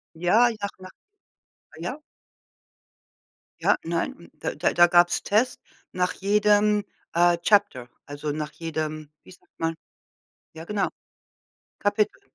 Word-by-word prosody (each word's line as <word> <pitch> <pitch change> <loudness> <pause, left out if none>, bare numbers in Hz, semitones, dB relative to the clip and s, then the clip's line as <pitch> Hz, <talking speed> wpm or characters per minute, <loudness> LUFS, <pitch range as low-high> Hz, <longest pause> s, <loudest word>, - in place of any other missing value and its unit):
Ja, 210 +9 +4
nach 200 0 -2
nach 185 0 -11 0.9
ja? 175 - -5 1.6
Ja, - - +4
nein, 170 0 -2
hm, 170 - -16
da - - -3
da 155 - 0
da 175 0 +6
gab's 175 0 +4
Tests 230 +5 +1 0.3
nach 180 0 0
jedem, 210 +1 +3 0.3
äh, 175 +1 +4
Chapter, 170 - +2 0.2
also 145 +1 -5
nach 150 0 -4
jedem, 155 -2 -5
wie - - -15
sagt 180 0 -22
man 165 0 -1 0.8
ja, 160 +1 -9
genau, 200 -1 0 0.9
Kapitel, 205 +1 0
175 Hz, 120 wpm, -25 LUFS, 165-205 Hz, 1.6 s, da